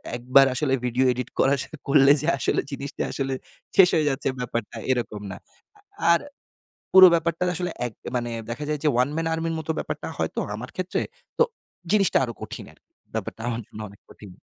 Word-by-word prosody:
১ 120 - -6
বার 135 0 +10
আসলে 135 -1 +1
video 125 +2 +1
edit 125 0 -4
করা 135 - +4
শুরু 155 - -11
করলে 140 -1 +6
যে, 155 - -3
আসলে - - 0
জিনিসটা 140 +1 -4
আসলে 135 -1 -2 0.4
শেষ 185 -2 +8
হয়ে 155 -2 +2
যাচ্ছে 135 0 -2
ব্যাপারটা। 120 -3 -4
এরকম 115 -4 -2
না। - - -7 0.8
আর - - +2 0.7
পুরো 185 -1 +12
ব্যাপারটা 165 +1 0
আসলে 180 0 -2
এক 115 - -5 0.2
মানে 120 -1 -1 0.2
দেখা 135 +6 -4
যায় 150 -1 -1
যে, - - +2
ওয়ান 125 +3 +3
ম্যান 165 0 -1
আর্মির 165 0 -2
মতো 160 +1 -2
ব্যাপারটা - - -4
হয়তো - - -2 0.2
আমার 125 +4 -7
ক্ষেত্রে। 185 0 -2 0.4
তো, 475 - +6 0.5
জিনিসটা 200 -3 +4
আরো 120 -2 -3
কঠিন - - -7
আরকি। - - -32 0.2
ব্যাপারটা 110 - -4
আমার 115 0 -3
জন্য 110 - -11
অনেক 100 - -17
কঠিন। 105 - -13
135 Hz, 185 wpm, -24 LUFS, 120-165 Hz, 0.8 s, পুরো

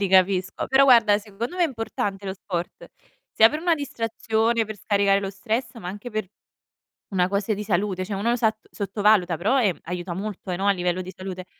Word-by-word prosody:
Li 200 - +1
capisco. 185 0 +2
Però 270 +1 +5
guarda 230 -6 +6
secondo 220 - -6
me 360 - +2
è - - +5
importante 205 -6 -4
lo 190 - -2
sport, 180 -3 -5 0.4
sia 220 +1 +7
per 300 +4 -4
una 345 -1 +3
distrazione, 230 -4 -1
per 215 0 -7
scaricare 200 0 +2
lo 195 - -3
stress, 220 +7 -3
ma 180 -6 -7
anche 210 +6 -7
per 215 -2 -2 0.8
una 180 -2 +1
cose 200 +2 0
di 210 +1 -4
salute, 190 -1 0
cioè 200 0 -4
uno 235 +4 +1
sat 220 -2 +1
sottovaluta 200 -4 +2
però, 250 +9 +2
ehm, 195 -7 +1
aiuta 175 +1 -4
molto, 195 0 -6
eh, 180 - -1
no, 195 +3 -3
a - - +6
livello 180 -1 -1
di 185 +1 -8
salute. 185 -1 -7
205 Hz, 200 wpm, -24 LUFS, 185-225 Hz, 0.8 s, sia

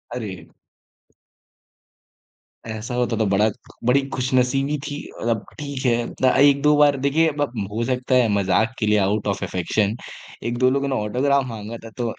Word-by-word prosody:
अरे! 105 -6 -6 2.2
ऐसा 110 +3 -5
होता 120 -2 0
तो 110 - +1
बड़ा 100 +2 +3 0.4
बड़ी 135 +3 +4
खुशनसीबी 130 +3 +1
थी, 145 - -4 0.2
मतलब 115 -2 -1
ठीक 140 -3 -5
है। 120 -1 +2
उतना 130 -1 +1
एक 140 0 +5
दो 150 +1 +4
बार 145 -1 +5
देखिए 160 +4 +3
अब 145 -4 -2 0.2
हो 115 +2 -2
सकता 125 +1 0
है 125 -2 +4
मज़ाक 100 +3 +1
के 110 - +1
लिए 105 0 +3
आउट 100 +2 0
ऑफ 100 0 -1
अफेक्शन 95 +4 0 0.5
1 120 +1 -2
2 130 +1 +4
लोगों 140 +1 0
ने 135 - -1
ऑटोग्राफ़ 130 +6 +1
माँगा 110 -1 -7
था। - - -8
तो 120 -2 -2
125 Hz, 165 wpm, -22 LUFS, 110-140 Hz, 2.2 s, एक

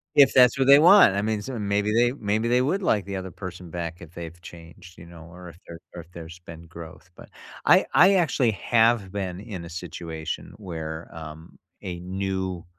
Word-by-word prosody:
If 140 -2 +6
that's 125 0 +5
what 135 - +2
they 140 +1 +8
want. 175 - +7
I 100 - 0
mean, 110 0 -2
so 130 +3 -6
maybe 105 0 -1
they 120 +1 +3
maybe 110 -2 -2
they 125 +1 +3
would 185 +10 -1
like 105 - +1
the 100 -1 -6
other 95 -1 -6
person 90 -1 -9
back 85 0 -6
if 85 -1 -13
they've 85 0 -9
changed, 85 +1 -14
you 85 - -12
know, 85 -1 -13
or 90 0 -12
if 85 - -13
there 85 -1 -10 0.2
or 85 - -7
if 85 +2 -20
there's 85 0 -11
been 85 -1 -12
growth. 85 +1 -12
But - - -15 0.4
I - - +5
I 195 +3 +6
actually 145 -9 +1
have 115 0 +1
been 95 -3 -5
in 100 -5 -8
a 85 - -10
situation 80 -2 -7
where, 80 -5 -7
um, 80 0 -11 0.2
a 90 -2 -6
new 95 -1 -4
95 Hz, 205 wpm, -24 LUFS, 85-110 Hz, 0.4 s, they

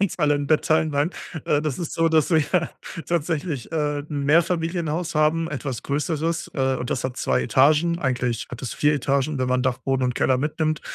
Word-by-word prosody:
uns 195 -2 0
alle 150 -2 +3
'n 145 0 -2
Bett 155 0 +2
teilen, 155 0 +2
nein. 145 +4 +1 0.3
Äh, 150 0 +1
das 150 -1 -2
ist 170 - -4
so, 165 0 +2
dass 160 +1 +2
wir 165 +2 +2 0.4
tatsächlich, 160 -4 -2
äh, 150 -2 0
'n 145 -1 -4
Mehrfamilienhaus 165 +1 +1
haben 160 +2 +2
etwas 135 -3 -4
Größeres, 155 +3 -2
äh, 135 -2 +1
und 125 - -5
das 130 - -2
hat 130 -1 -3
2 65 -1 +1
Etagen. 155 - +3
Eigentlich 125 -5 -1
hat 125 - -7
es 125 - -4
4 150 0 +2
Etagen, 140 0 0
wenn 130 0 0
man 125 0 +1
Dachboden 130 0 0
und 125 -1 0
Keller 130 - +2
mitnimmt, 155 +2 -1
150 Hz, 195 wpm, -23 LUFS, 135-160 Hz, 0.4 s, alle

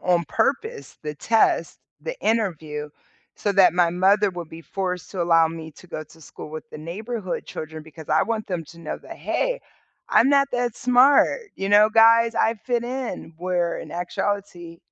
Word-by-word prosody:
on 175 -2 +2
purpose, 285 - -1
the 150 0 -4
test, 225 +8 +1 0.2
the - - -6
interview, 160 -9 -1 0.5
so 205 - -1
that 190 -3 +5
my 175 -2 +3
mother 195 +3 +3
will 175 -1 -6
be 160 +1 -11
forced 180 -1 -4
to 185 - -1
allow 165 -1 +5
me 160 -1 -8
to 180 - -16
go 155 -3 -6
to 160 - -19
school 155 - -10
with 155 0 -8
the - - -9
neighborhood 195 +5 -5
children 155 0 -7
because 160 0 -12
I 155 - +3
want 225 -1 -2
them 175 -4 -3
to 170 +1 -14
know 155 - -5
that, - - -11
"Hey, - - -1 0.5
I'm 265 - +5
not 280 -1 +4
that 245 -2 -1
smart, 275 - +4
you 195 0 -3
know, 210 +1 +6
guys, 230 +1 +6
I 225 - +2
fit 240 -2 0
in." 250 -9 -5
Where, 175 -1 -1
in - - -9
actuality, 175 -1 -3
185 Hz, 180 wpm, -23 LUFS, 165-230 Hz, 0.5 s, know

